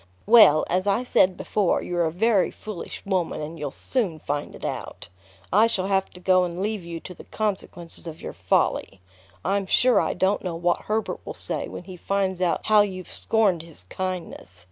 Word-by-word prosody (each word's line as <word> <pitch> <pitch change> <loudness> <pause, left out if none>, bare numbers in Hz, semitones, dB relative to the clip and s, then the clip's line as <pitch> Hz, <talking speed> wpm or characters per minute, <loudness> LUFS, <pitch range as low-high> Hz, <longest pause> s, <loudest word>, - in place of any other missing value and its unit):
"Well, 215 -8 +7
as 185 +3 0
I 200 +5 +2
said 185 -7 +3
before, 200 -4 0
you're 175 -1 0
a 160 - 0
very 205 +3 +2
foolish 210 -5 -8
woman; 185 -4 -1
and 155 +2 -6
you'll 145 -1 -3
soon 195 - -1
find 145 -1 -4
it - - -8
out. - - -5 0.4
I 215 +4 +6
shall 190 -5 0
have 195 -1 +1
to 180 - -11
go 185 0 +4
and 175 0 -4
leave 210 -1 -2
you 170 -1 -6
to 180 - -9
the - - -13
consequences 190 -5 -4
of 160 -1 -7
your - - -7
folly. 95 - 0 0.5
I'm 195 -1 0
sure 250 +5 +4
I - - -1
don't 190 +3 +1
know 180 -3 -3
what 175 +1 0
Herbert 215 +1 -1
will - - -7
say - - -4
when - - -8
he 185 0 -10
finds 190 0 -1
out 175 -2 +1
how 215 -1 +6
you've 185 -3 -3
scorned 205 -7 +2
his 165 - -13
kindness. 180 - -5
185 Hz, 195 wpm, -24 LUFS, 170-205 Hz, 0.5 s, Well